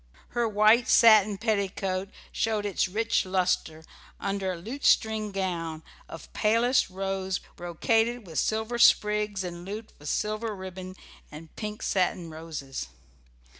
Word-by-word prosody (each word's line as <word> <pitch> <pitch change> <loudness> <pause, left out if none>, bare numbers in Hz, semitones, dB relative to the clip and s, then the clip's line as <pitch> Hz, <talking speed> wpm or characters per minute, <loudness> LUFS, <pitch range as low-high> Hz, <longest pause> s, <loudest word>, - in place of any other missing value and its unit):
Her 240 -2 0
white 215 +3 +4
satin 215 -3 +6
petticoat 195 -3 -1 0.2
showed 215 -2 -1
its 200 -1 0
rich 225 +5 0
lustre 180 -4 -1 0.4
under 195 -1 -2
a - - -7
lutestring 220 0 +1
gown 170 -5 -3 0.3
of 165 - -11
palest 230 +3 +2
rose 190 0 -2 0.2
brocaded 225 +7 0
with 165 -3 -3
silver 220 +2 -1
sprigs 210 -3 +3
and 175 -1 -6
looped 210 +4 -7
with 145 0 -6
silver 215 +1 -2
ribbon 185 -1 -8 0.4
and 155 +2 -12
pink 210 0 -6
satin 180 -3 0
roses. 155 - -6
195 Hz, 125 wpm, -27 LUFS, 180-220 Hz, 0.4 s, satin